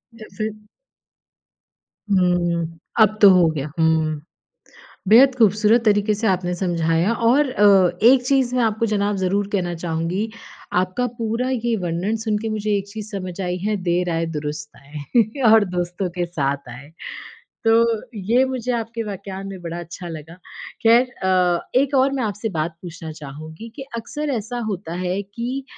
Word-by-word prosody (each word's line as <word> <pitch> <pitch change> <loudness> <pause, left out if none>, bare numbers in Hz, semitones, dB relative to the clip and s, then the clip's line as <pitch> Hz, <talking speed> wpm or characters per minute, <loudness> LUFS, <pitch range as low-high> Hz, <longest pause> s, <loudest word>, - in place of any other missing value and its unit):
जैसे। 215 -1 -5 1.6
हुँ, 175 -3 +1 0.2
अब 215 -1 +5
तो 200 - +10
हो 180 -3 +5
गया 150 -1 -4
हुँ। 160 -2 +2 0.9
बेहद 255 +5 +7
ख़ूबसूरत 220 0 +4
तरीक़े 210 0 +3
से 220 +2 -2
आपने 180 -2 0
समझाया 170 +2 +1
और 250 +5 +3
अ, 200 -6 +5 0.2
एक 255 0 +6
चीज़ 260 -2 +2
मैं 250 - +2
आपको 220 0 +1
जनाब 205 -1 0
ज़रूर 195 +2 0
कहना 175 -3 -1
चाहूँगी 170 +5 -2 0.5
आपका 185 +7 -1
पूरा 230 +3 -1
ये 240 -2 0
वर्णन 180 +4 -2
सुनके 220 0 -1
मुझे 215 -1 0
एक 200 0 -4
चीज़ 215 +1 -8
समझ 185 -1 -6
आई 180 -1 -2
है 210 0 0
देर 175 0 0
आये 165 0 -1
दुरुस्त 150 0 -5
आए 205 - -2
और 220 -1 +6
दोस्तों 180 0 -3
के 175 0 -2
साथ 140 -5 -2
आए। 125 +4 -10 0.8
तो 225 -1 +3 0.2
ये 225 +6 +2
मुझे 255 -2 -3
आपके 230 0 -3
वाक्यान 195 -1 -6
में 195 -2 -7
बड़ा 170 0 -5
अच्छा 175 +1 -8
लगा। 160 -1 -8 0.5
ख़ैर 230 +2 +7 0.2
अ, 180 -2 +1
एक 275 +2 +2
और 265 +1 +4
मैं 265 -3 -1
आपसे 210 +1 -3
बात 160 +1 -3
पूछना 165 -2 -8
चाहूँगी 155 +7 -9
कि 270 - -6
अक्सर 295 +6 -4
ऐसा 225 +3 -5
होता 185 -4 -5
है 185 +2 -1
कि 240 +7 -5
195 Hz, 155 wpm, -21 LUFS, 170-225 Hz, 1.6 s, तो